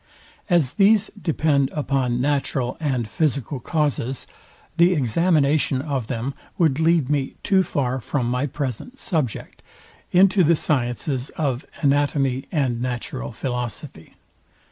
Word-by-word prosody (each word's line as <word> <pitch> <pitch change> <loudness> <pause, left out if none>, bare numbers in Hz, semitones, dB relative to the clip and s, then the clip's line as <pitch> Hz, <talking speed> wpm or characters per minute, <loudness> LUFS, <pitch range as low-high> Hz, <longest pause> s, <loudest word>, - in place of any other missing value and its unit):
As 165 -8 +3
these 205 +1 +4
depend 155 -8 +1
upon 135 -4 0
natural 135 -2 0
and 130 -7 -1
physical 140 +2 -1
causes, 135 -3 -1 0.5
the 175 +2 +5
examination 145 0 +2
of 135 -5 -3
them 125 +2 -3 0.2
would 155 -5 +2
lead 160 -3 +3
me 140 -2 -1
too 190 -1 +4
far 130 -7 -1
from 125 +2 -2
my 125 +4 0
present 140 - -5
subject, 155 - -2 0.5
into 190 +1 +5
the 170 +1 +4
sciences 130 -1 -1
of 140 -4 -1 0.2
anatomy 140 -2 +1
and 130 -8 0
natural 120 - -4
philosophy. 125 - -5
140 Hz, 120 wpm, -23 LUFS, 125-160 Hz, 0.5 s, the